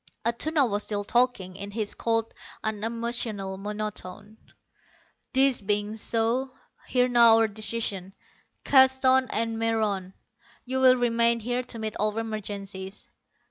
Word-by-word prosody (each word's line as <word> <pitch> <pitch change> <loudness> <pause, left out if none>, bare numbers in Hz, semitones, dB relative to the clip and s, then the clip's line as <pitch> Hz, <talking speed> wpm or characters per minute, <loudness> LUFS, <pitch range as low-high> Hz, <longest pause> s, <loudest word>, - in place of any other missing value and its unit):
Atuna 275 +5 +1
was 205 -2 -1
still 205 -1 -3
talking, 220 -5 0
in 200 +1 -7
his 210 0 -2
cold, 225 -1 -1 0.3
unemotional 220 -2 -3
monotone. 210 0 -6 1.0
"This 265 -2 +3
being 205 +1 -1
so, 230 +4 +1 0.4
hear 250 -1 +2
now 235 -2 +6
our 225 0 +3
decision. 205 -3 -2 0.5
Keston 265 -1 +4
and 225 0 -1
Meron, 210 -5 -1 0.5
you 260 +1 -2
will 255 -1 +6
remain 235 -1 +2
here 245 +3 -2
to 245 -1 -9
meet 220 -1 -4
all 210 +1 -1
emergencies. 200 -3 -6
225 Hz, 120 wpm, -26 LUFS, 205-240 Hz, 1.0 s, now